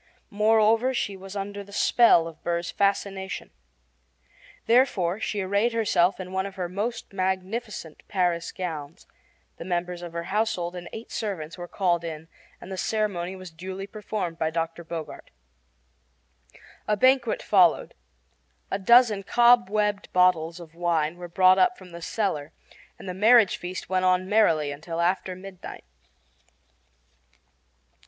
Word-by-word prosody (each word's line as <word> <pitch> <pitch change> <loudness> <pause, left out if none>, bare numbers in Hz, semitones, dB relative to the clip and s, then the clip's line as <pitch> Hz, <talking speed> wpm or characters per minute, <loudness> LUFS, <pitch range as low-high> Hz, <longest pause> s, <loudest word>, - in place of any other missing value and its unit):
Moreover, 220 +4 +3
she 200 -4 -2
was 190 +1 -10
under 200 0 -5
the 200 - -16
spell 200 -5 +4
of 160 -1 -11
Burr's 170 0 -2
fascination. 195 -1 -1 1.1
Therefore 220 -7 +2
she 210 -2 -2
arrayed 200 +5 +1
herself 195 -5 +2
in 185 -1 -7
one 190 +1 -1
of 195 - -11
her 180 -3 -3
most 210 +5 -4
magnificent 190 -1 -3
Paris 175 -4 0
gowns; 160 -5 -6 0.5
the - - -7
members 175 0 -3
of 175 -1 -8
her 170 0 -3
household 180 -3 -1
and 175 -1 -8
eight 225 - -9
servants 175 -7 -4
were 175 -1 -8
called 175 -2 0
in 160 -1 -7 0.3
and 195 - -11
the 190 - -5
ceremony 190 -3 -1
was 185 -2 -10
duly 185 +4 -7
performed 205 -5 -5
by 160 - +1
Dr. 165 +1 -3
Bogart. 165 -1 -7 1.6
A 210 - +1
banquet 255 0 +3
followed. 180 -5 +3 0.8
A 195 - -1
dozen 230 0 +5
cobwebbed 210 -2 +3
bottles 175 -2 +2
of 165 -2 -12
wine 170 -2 0
were 175 0 -8
brought 185 +2 +4
up 190 +6 +3
from 185 -2 -14
the 170 0 -9
cellar, 165 -7 -2 0.5
and - - -11
the 180 - -3
marriage 215 +1 +5
feast 180 +1 -6
went 185 0 0
on 185 0 +2
merrily 165 -9 +3
until 165 +4 -6
after 180 +1 0
midnight. 185 0 -10
185 Hz, 140 wpm, -25 LUFS, 170-210 Hz, 1.6 s, dozen